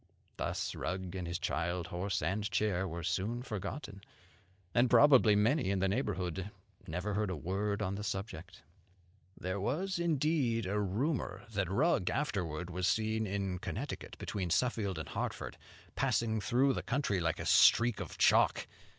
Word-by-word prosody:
Thus - - -2
Rugg 95 -1 -4
and 90 -2 -4
his 85 0 -2
child, 85 0 -2
horse 90 0 -2
and 100 +5 -1
chair, 95 -3 0
were 85 0 -5
soon 100 +9 -1
forgotten; 105 -1 -6 0.7
and 120 +1 +4
probably 130 -8 +7
many 110 +3 +2
in 100 - +1
the 95 +1 +1
neighbourhood 95 - -2 0.4
never 90 +6 -3
heard 105 0 0
a 90 - -2
word 100 +6 -2
on 95 -1 -1
the 100 +1 -4
subject. 95 -2 -5 0.8
"There 95 +2 -3
was 185 - -1
indeed 150 - +1
a 100 +3 0
rumour 115 - -1
that 100 -3 0
Rugg 95 -1 +2
afterward 90 - -2
was 90 +1 -1
seen 110 +1 +1
in 95 -2 -2
Connecticut, - - -5
between 95 -4 -3
Suffield 105 -3 0
and 80 - -5
Hartford, - - -4 0.4
passing 115 -4 +1
through 125 +6 +3
the - - -2
country 125 -8 0
like 85 -2 0
a - - -5
streak 120 -1 +5
of - - -6
chalk. - - +4
100 Hz, 155 wpm, -33 LUFS, 90-115 Hz, 0.8 s, probably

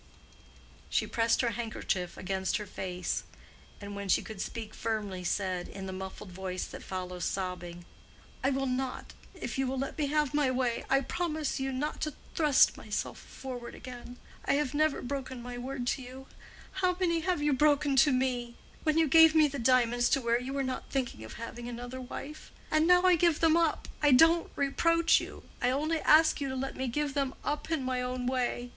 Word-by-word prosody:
She - - +1
pressed 230 0 +2
her 235 -2 +1
handkerchief 210 -5 -3
against 190 0 -1
her 210 - -5
face, 180 -2 -3 0.6
and 205 0 -7
when 200 -1 -5
she - - +3
could 215 -4 -7
speak 225 -2 -5
firmly 205 -5 -3
said, 185 -1 -1
in 195 -1 -7
the 190 - -5
muffled 190 +1 -7
voice 185 0 -4
that - - -9
follows 180 -1 -5
sobbing, 175 -2 -4 0.6
"I 270 - +3
will 270 0 0
not—if 260 +1 -4
you 270 - +1
will 265 +1 -2
let 275 +1 -3
me 295 - +1
have 300 -1 +1
my 295 -3 +2
way—I 255 +1 +1
promise 310 -1 -2
you 270 0 -1
not 280 +4 -3
to 305 -3 -2 0.2
thrust 300 -4 +4
myself - - -4
forward 250 -3 -8
again. 245 -1 -9 0.3
I - - +1
have 285 -1 0
never 305 0 +1
broken 260 -1 -4
my 245 0 -6
word 260 0 -4
to - - -1
you—how 270 +8 -5
many 335 -3 +2
have 340 -2 -1
you 295 -1 +3
broken 290 0 +3
to 290 +2 +6
me? 250 -2 0 0.3
When 310 0 +1
you 325 -1 +4
gave 320 +2 +7
me 310 -1 +6
the 280 -1 -5
diamonds 240 -1 +3
to 275 - +2
wear 235 0 +1
you 260 +2 -5
were 275 0 0
not 260 -1 -4
thinking 250 - -2
of 110 - -9
having 235 +1 -7
another 245 +2 -6
wife. 280 +4 -8 0.2
And 310 +3 +4
I 360 0 +7
now 365 -1 +6
give 335 -2 +3
them 325 -1 +4
up—I 310 -3 +1
don't 330 +5 +5
reproach 330 +4 +3
you—I 245 - -4
only 305 +5 0
ask 310 0 +5
you 275 - -1
to 260 - -3
let 270 +1 -3
me 260 - -2
give 290 +3 -1
them 275 -2 -1
up 295 +2 -2
in 320 -5 0
my 255 -1 -1
own 250 0 -3
way. 245 -1 -1
260 Hz, 190 wpm, -30 LUFS, 235-295 Hz, 0.6 s, gave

